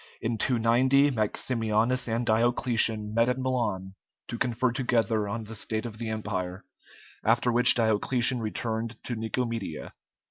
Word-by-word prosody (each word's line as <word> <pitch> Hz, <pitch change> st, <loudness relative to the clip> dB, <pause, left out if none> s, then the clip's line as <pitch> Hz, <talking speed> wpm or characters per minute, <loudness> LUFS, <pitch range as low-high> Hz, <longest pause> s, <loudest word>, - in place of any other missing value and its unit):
In 115 Hz, -1 st, -2 dB
290 130 Hz, +4 st, +3 dB
Maximianus 115 Hz, +1 st, 0 dB
and 115 Hz, +1 st, -1 dB
Diocletian 115 Hz, -2 st, +1 dB
met 115 Hz, +2 st, +3 dB
at 125 Hz, -, 0 dB
Milan 120 Hz, -8 st, -2 dB, 0.4 s
to 120 Hz, -, -4 dB
confer 125 Hz, +1 st, 0 dB
together 115 Hz, -4 st, 0 dB
on 115 Hz, +3 st, -4 dB
the 110 Hz, +1 st, -9 dB
state 110 Hz, +1 st, -3 dB
of 110 Hz, -2 st, -7 dB
the 115 Hz, -2 st, -4 dB
Empire, 95 Hz, -4 st, -4 dB, 0.6 s
after 120 Hz, +2 st, +2 dB
which 125 Hz, +1 st, +6 dB
Diocletian 120 Hz, +3 st, +1 dB
returned 110 Hz, +1 st, -3 dB
to 120 Hz, -, -2 dB
Nicomedia. 115 Hz, -6 st, -4 dB
115 Hz, 135 wpm, -27 LUFS, 110-120 Hz, 0.6 s, which